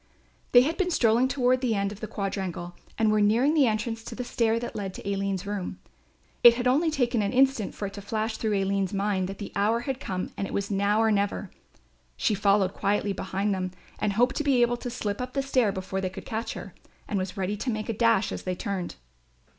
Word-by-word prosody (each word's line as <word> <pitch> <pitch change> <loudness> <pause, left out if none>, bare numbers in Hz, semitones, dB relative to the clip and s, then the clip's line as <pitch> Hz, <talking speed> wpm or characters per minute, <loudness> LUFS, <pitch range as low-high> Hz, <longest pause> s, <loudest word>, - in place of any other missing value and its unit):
They 245 - +8
had 315 +6 0
been 380 -2 +1
strolling 240 -5 +3
toward 255 -1 +2
the 255 - 0
further 205 - 0
end 200 0 0
of 205 - -9
the 215 - -5
quadrangle 190 -4 -4 0.2
and 220 -1 +3
were 215 0 +3
nearing 235 +8 +4
the 290 -5 +4
entrance 225 +1 -2
to - - -7
the 250 - -3
stair 230 -2 +1
that 240 - -6
led 195 -2 -4
to - - -8
Aline's 195 -1 -1
room. 200 -2 -4 0.7
It 235 -1 +10
had 245 +1 -3
only 295 +6 +3
taken 245 -6 +1
an 200 - 0
instant 265 -4 +2
for 205 - -4
it 195 - -5
to 200 - -7
flash 220 +2 -2
through 215 -2 0
Aline's 195 0 0
mind 195 -2 0
that 195 - -6
the 205 - -7
hour 215 +4 +2
had 265 +1 -3
come 185 -5 -4
and 195 - -3
it - - -8
was 200 +1 -2
now 200 +2 +2
or 220 - +3
never. 200 -1 -1 0.7
She 220 - +1
followed 200 -1 +2
quietly 200 0 0
behind 195 +2 -1
them 185 -1 -3 0.3
and 205 - 0
hoped 245 +5 +2
to 300 - 0
be 265 -4 +4
able 240 0 +1
to 245 - -5
slip 215 -3 -3
up 250 0 -5
the 275 - 0
stair 255 -6 +2
before 190 0 -4
they 185 - -1
could 185 - -9
catch 225 +1 -3
her, - - -8 0.3
and 200 - -1
was 185 0 -4
ready 195 +2 -1
to 250 - -3
make 215 -2 -2
a 230 - -1
dash 230 -2 +2
as - - -4
they 185 -1 -3
turned. 185 -1 -4
210 Hz, 240 wpm, -27 LUFS, 195-240 Hz, 0.7 s, It